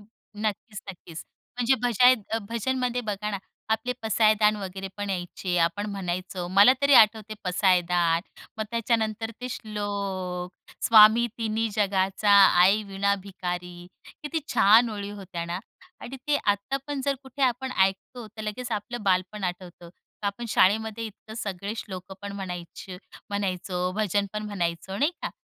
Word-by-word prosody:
नक्कीच 210 0 -6
नक्कीच. 170 -3 -10 0.3
म्हणजे 250 +1 +3
भजाय 250 +1 +6 0.2
अ, 225 - +2
भजनमध्ये 250 +1 -1
बघा 210 -2 -3
ना 200 - -3 0.3
आपले 220 +3 -1
पसायदान 215 -1 +3
वगैरे 195 -1 -6
पण 205 -1 -3
यायचे. 180 0 -3
आपण 175 +5 +1
म्हणायचो 180 -1 -4
मला 205 +6 +9
तरी 280 0 +5
आठवते 215 -1 +5
पसायदान. 180 -2 +2 0.4
मग 220 - -1
त्याच्यानंतर 225 -1 -1
ते 250 - -4
श्लोक, 200 -5 -4 0.4
"स्वामी 220 +1 +7
तिन्ही 225 0 -1
जगाचा 195 0 +1 0.3
आई 200 +4 +4
वीणा 200 +1 +1
भिकारी." 180 -2 -6 0.4
किती 315 +2 -2
छान 225 +4 +6
ओळी 205 -1 -5
होत्या 190 -4 -6
ना. 170 +1 -4 0.4
आणि 265 - -7
ते 295 -1 +3
आता 205 +6 0
पण 290 -2 -3
जर 280 -1 +1
कुठे 265 +1 -6
आपण 260 +1 +1
ऐकतो, 195 +5 0
तर 215 +1 -10
लगेच 225 +3 -4
आपलं 220 +3 -4
बालपण 190 +1 0
आठवतं. 175 -1 -6 0.3
का - - -1
आपण 200 +4 -3
शाळेमध्ये 220 +2 +2
इतकं 220 +1 -12
सगळे 200 -1 -4
श्लोकं 190 -3 -7
पण 200 - -5
म्हणायची 180 -1 -7 0.3
म्हणायचो, 185 -2 -2
भजन 205 -1 +1
पण 210 0 -3
म्हणायचो, 190 -1 -3
नाही 290 +8 +2
का? - - -2
205 Hz, 145 wpm, -26 LUFS, 185-225 Hz, 0.4 s, मला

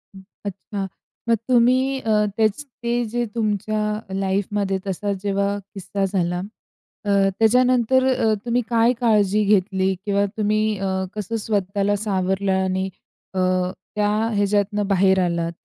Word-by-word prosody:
हं, 190 - -11 0.2
अच्छा. 200 0 -5 0.4
मग 230 - +5
तुम्ही 255 +2 +3
अ, 215 -3 +2
तेचं, 220 +5 +1 0.2
ते 240 +1 +1
जे 240 +2 -2
तुमच्या 215 -1 -1 0.4
लाइफमध्ये 195 0 0
तसा 200 +2 -2
जेव्हा 200 0 0 0.2
किस्सा 195 0 -2
झाला, 180 -2 -1 0.7
अ, - - -2 0.3
त्याच्यानंतर 250 +2 +4
अ, 225 -3 +2
तुम्ही 240 +1 +1
काय 230 +1 +4
काळजी 210 -3 +3
घेतली 190 -1 +2
किंवा 200 -1 +2
तुम्ही 215 0 +1 0.2
अ, 195 - -1 0.3
कसं 210 +2 -3
स्वतःला 200 -1 0
सावरलं 190 0 0
आणि 190 0 -1 0.4
अ, 190 - -2 0.6
त्या 210 0 +2 0.3
ह्याच्यातनं 205 0 +1
बाहेर 190 -1 +3
आलात? 170 -1 -1
205 Hz, 125 wpm, -22 LUFS, 195-225 Hz, 0.7 s, मग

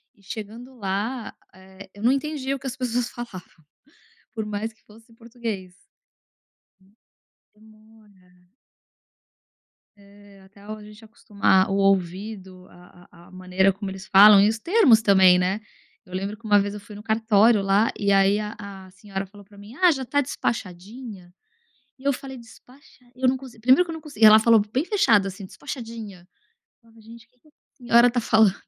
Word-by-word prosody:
e 200 - -27
chegando 225 +6 -9
lá, 210 +5 -4 0.2
eh, 190 +1 -15
eu 205 - -14
não 245 - +4
entendi 275 -1 -2
o 275 - -5
que 270 - -7
as 260 +1 -6
pessoas 245 -1 -2
falavam, 235 -7 -8 0.9
por 220 - -4
mais 210 +2 -4
que 220 - -35
fosse 225 +2 -20
português. 225 -6 -7 1.8
Demora. 215 -4 -23 1.5
É 200 -1 -19
até 200 +1 -21
a 215 +1 -9
gente 210 +1 -15
acostumar 200 -3 0
o 195 - 0
ouvido 190 0 -2
a 175 0 -19
a 170 0 -18
a - - -19
maneira 185 +1 0
como 195 0 -7
eles 190 0 -10
falam 200 +1 +8
e 205 - +4
os 220 0 -2
termos 305 - +4
também, 190 -3 +5
né? 190 +4 -1 0.5
Eu 180 - -13
lembro 200 +3 -4
que 225 0 -14
uma 205 -1 +5
vez 200 0 -3
eu 210 - -8
fui 205 +1 -13
no 205 - -10
cartório 220 -1 +3
lá 200 +3 +2
e 200 -1 +1
aí 195 +1 +3
a 210 0 -5
a 195 -2 -11
senhora 195 0 -7
falou 205 +1 -16
pra 200 +1 -20
mim: 205 +4 -13
"Ah, 360 0 +4
já 265 -2 -4
tá 285 +3 0
despachadinha?" 205 -5 -6 0.7
E 265 - -18
eu 280 - +2
falei: 265 0 -8
"Despacha" 250 +3 -19
eu 255 +1 0
nunca 260 +1 -1
usei, 230 -3 -15
primeiro 260 +9 +4
que 340 - -9
eu - - -5
nunca 320 -1 -10
consegui, 230 -8 +3
ela 215 0 +9
falou 225 -1 +4
bem 265 +6 0
fechada 225 - +2
assim: 195 0 -9
"Despachadinha". 225 -8 -9 0.5
Falava: 230 -1 -22
"Gente 230 +1 -15
o - - -45
que 250 0 -39
que 305 - -27
essa - - -31 0.2
senhora 240 -1 +4
está 245 0 -1
falando? 220 -3 +3
215 Hz, 180 wpm, -23 LUFS, 195-235 Hz, 1.8 s, ela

